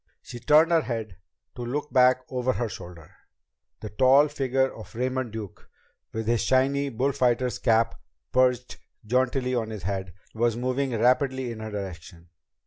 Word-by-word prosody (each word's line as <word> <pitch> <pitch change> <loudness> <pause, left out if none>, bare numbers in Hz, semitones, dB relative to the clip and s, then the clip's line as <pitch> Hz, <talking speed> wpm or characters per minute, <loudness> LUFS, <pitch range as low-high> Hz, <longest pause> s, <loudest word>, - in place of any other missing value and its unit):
She 120 - -9
turned 155 +7 +4
her 165 -1 +4
head 110 - -5 0.4
to - - -7
look 145 +5 -4
back 130 -1 +5
over 130 0 -1
her 120 - -2
shoulder. 85 -6 -10 0.7
The 105 - -7
tall 135 +6 +5
figure 135 -2 0
of 110 - -12
Raymond 130 0 -2
Duke, 110 -3 -9 0.4
with 110 0 -4
his 115 0 +1
shiny 140 +2 +2
bullfighter's 125 -1 0
cap 115 -1 +1 0.3
perched 125 -1 +1 0.3
jauntily 125 +2 0
on 115 -3 -1
his 105 -4 -7
head, 95 -1 -4 0.2
was 115 0 0
moving 130 -1 -1
rapidly 130 +1 +2
in 115 - -7
her 110 0 -6
direction. 90 -4 -8
125 Hz, 150 wpm, -26 LUFS, 110-130 Hz, 0.7 s, back